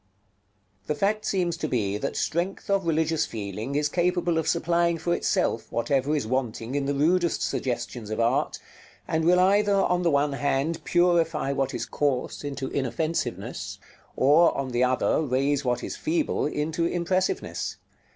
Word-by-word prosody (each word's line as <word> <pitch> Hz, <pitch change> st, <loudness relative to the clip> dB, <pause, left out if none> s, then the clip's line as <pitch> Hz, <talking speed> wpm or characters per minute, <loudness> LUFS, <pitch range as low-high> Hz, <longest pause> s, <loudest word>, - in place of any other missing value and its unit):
§ -, -, -44 dB
LX. 100 Hz, +1 st, -41 dB
The 150 Hz, -, 0 dB
fact 210 Hz, +7 st, 0 dB
seems 175 Hz, -4 st, 0 dB
to 155 Hz, -, -2 dB
be 105 Hz, -7 st, 0 dB
that -, -, -3 dB
strength 180 Hz, +4 st, -2 dB
of 195 Hz, -3 st, +1 dB
religious 160 Hz, 0 st, +1 dB
feeling 105 Hz, +5 st, -5 dB
is 150 Hz, 0 st, +2 dB
capable 175 Hz, 0 st, +1 dB
of 160 Hz, -, -3 dB
supplying 170 Hz, 0 st, +2 dB
for 170 Hz, +2 st, -1 dB
itself 115 Hz, -, 0 dB
whatever 135 Hz, +5 st, +1 dB
is 145 Hz, -, -1 dB
wanting 120 Hz, -1 st, -2 dB
in 140 Hz, -1 st, -1 dB
the 140 Hz, -, 0 dB
rudest 170 Hz, +4 st, +2 dB
suggestions 120 Hz, -3 st, -3 dB
of 110 Hz, -, -3 dB
art, 115 Hz, 0 st, +1 dB, 0.5 s
and 160 Hz, 0 st, 0 dB
will 180 Hz, +2 st, +5 dB
either, 200 Hz, +2 st, +4 dB
on 180 Hz, -2 st, +2 dB
the 175 Hz, -, +2 dB
one 145 Hz, -1 st, +2 dB
hand, 140 Hz, +3 st, -1 dB
purify 170 Hz, -5 st, +2 dB
what 135 Hz, -1 st, -1 dB
is -, -, -2 dB
coarse 140 Hz, -2 st, -1 dB
into 140 Hz, -2 st, -4 dB
inoffensiveness, 155 Hz, +5 st, -3 dB, 0.4 s
or, 150 Hz, +6 st, +4 dB
on 135 Hz, -1 st, -2 dB
the 120 Hz, +1 st, +2 dB
other, 130 Hz, +4 st, +2 dB
raise 140 Hz, 0 st, +1 dB
what 125 Hz, -2 st, -1 dB
is -, -, -4 dB
feeble 315 Hz, -, 0 dB
into 155 Hz, +3 st, -1 dB
impressiveness. 180 Hz, +2 st, -1 dB
150 Hz, 165 wpm, -26 LUFS, 130-170 Hz, 0.5 s, will